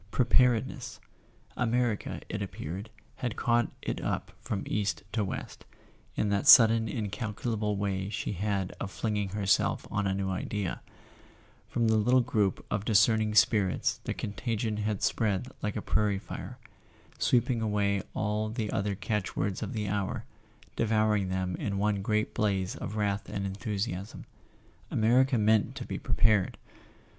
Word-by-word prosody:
Preparedness! 125 0 +2 0.6
America, 120 -3 0
it - - -4
appeared, 95 +8 -5 0.3
had 120 -3 -3
caught 120 -1 +1
it - - -3
up - - -2
from 100 - -3
east 105 -1 -1
to 110 - 0
west, 95 - -6 0.5
in 105 - 0
that 100 0 0
sudden 115 -1 +8
incalculable 105 -1 -2
way 100 -1 -1
she 105 - -3
had 100 -1 -1
of 100 - -3
flinging 105 -1 -2
herself 100 -1 +1
on 100 - 0
a 95 - 0
new 95 -1 -1
idea; 95 0 -3 0.9
from 120 - -1
a 110 - +3
little 125 +4 +4
group 105 -7 0
of 105 -1 0
discerning 110 0 +3
spirits 105 -4 +3
the - - -1
contagion 110 0 -2
had 105 -1 -2
spread 110 +2 0
like 105 -1 -2
a - - -3
prairie 105 -2 +1
fire, - - -7 0.6
sweeping 120 -1 +2
away 100 -2 +1
all 110 0 -1
the 110 -2 -3
other 100 0 -1
catch¬ 105 0 -2
words 95 -1 -1
of - - -3
the 105 -2 -2
hour, 100 -1 -2 0.5
devouring 110 -3 +2
them 95 -1 -1
in 100 -1 -2
one 100 0 +1
great 110 +1 0
blaze 95 -3 0
of 105 - -6
wrath 100 -2 -1
and 100 - -3
enthusiasm. 100 0 -4 0.6
America 125 +4 +3
meant 110 0 +3
to - - -6
be - - -4
pre¬ - - -2
pared 110 -4 +3
105 Hz, 150 wpm, -29 LUFS, 100-110 Hz, 0.9 s, sudden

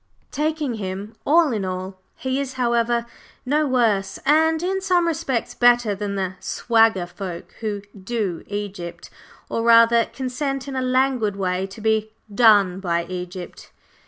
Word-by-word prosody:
Taking 305 -3 -1
him 200 +2 -5
all 320 0 +5
in 210 -3 -2
all, 185 0 -5
he 260 +1 -2
is, 275 -2 -3
however, 235 -2 +1 0.4
no 295 +3 +1
worse, 215 -7 +1
and 320 +2 +3
in 385 +1 -1
some 365 -3 +2
respects 315 -7 -1
better, 240 -3 +4
than 200 0 -4
the 190 -2 -2
"swagger" 225 -6 +2
folk 175 -1 -7
who 210 -2 -3
"do" 200 -3 -3
Egypt, 200 -4 -6 0.4
or 230 - -2
rather, 230 0 +6
consent 270 +1 -4
in 275 - -5
a 260 - 0
languid 255 -4 +1
way 185 -1 -1
to 195 +3 -11
be 220 0 0 0.2
"done" 205 -5 +5
by 170 -3 -1
Egypt. 180 0 -7
225 Hz, 145 wpm, -22 LUFS, 195-260 Hz, 0.4 s, rather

